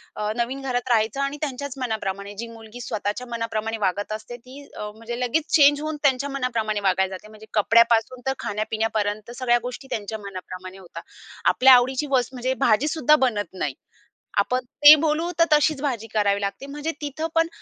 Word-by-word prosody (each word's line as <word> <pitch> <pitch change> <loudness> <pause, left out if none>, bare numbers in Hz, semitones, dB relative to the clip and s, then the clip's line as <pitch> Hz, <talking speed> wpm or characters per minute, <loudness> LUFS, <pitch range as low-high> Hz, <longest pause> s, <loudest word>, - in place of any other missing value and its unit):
अ, 210 0 -2
नवीन 255 +3 -2
घरात 255 -1 -2
राहायचं 220 +2 +2
आणि 275 +1 -2
त्यांच्याच 280 -2 -4
मनाप्रमाणे. 200 -4 -3
जी 235 - -5
मुलगी 230 +1 -11
स्वतःच्या 215 +3 -3
मनाप्रमाणे 225 -1 -3
वागत 205 +1 -1
असते 230 +3 -7
ती 255 +4 -13
अ, 210 - -5
म्हणजे 235 +2 -6
लगेच 255 +6 0
चेंज 290 -1 +6
होऊन 310 0 -3
त्यांच्या 275 0 +2
मनाप्रमाणे 230 -6 -1
वागायला 190 0 +1
जाते, 215 - -12
म्हणजे 215 0 -14
कपड्यापासून 230 +3 +3
तर 265 - +2
खाण्या-पिण्यापर्यंत 215 0 -2
सगळ्या 240 -2 +2
गोष्टी 250 +2 -7
त्यांच्या 220 +1 -4
मनाप्रमाणे 185 -1 -8
होतात. 185 -3 -10 0.5
आपल्या 260 0 +7
आवडीची 260 +4 +1
वस्त 255 -1 +1
म्हणजे 255 +1 -1
भाजीसुद्धा 300 +5 +3
बनत 205 -4 -3
नाही. 150 -7 -3 0.6
आपण 250 +5 +1 0.2
ते 295 +1 +12
बोलू 320 +2 0
तर 335 - +7
तशीच 295 -1 +3
भाजी 240 -6 -2
करावी 205 -1 +2
लागते 200 +6 -4
म्हणजे 295 +3 -4
तिथं 295 +3 -3
पण 330 0 +3
235 Hz, 170 wpm, -23 LUFS, 215-270 Hz, 0.6 s, ते